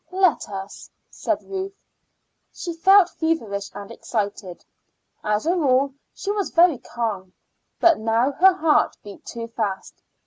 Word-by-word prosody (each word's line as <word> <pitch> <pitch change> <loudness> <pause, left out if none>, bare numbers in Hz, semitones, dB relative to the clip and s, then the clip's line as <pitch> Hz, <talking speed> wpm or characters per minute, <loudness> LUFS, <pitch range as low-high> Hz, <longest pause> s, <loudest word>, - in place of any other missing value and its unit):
"Let 370 - +2
us," 195 0 -8 0.2
said - - -2
Ruth. 390 0 -5 0.8
She 345 - -6
felt 380 +3 +6
feverish 225 - -2
and 205 +1 -8
excited. 205 -6 -4 0.6
As 210 +4 0
a 345 +3 +2
rule 275 -4 +2 0.2
she 405 - -4
was 410 -2 -1
very 335 -6 +4
calm, 205 -6 -4 0.5
but 340 -2 +5
now 225 +4 +1
her 370 +7 +5
heart 320 -4 +2
beat 205 -1 -11
too 230 -1 -6
fast. 215 -4 -4
260 Hz, 135 wpm, -23 LUFS, 210-345 Hz, 0.8 s, felt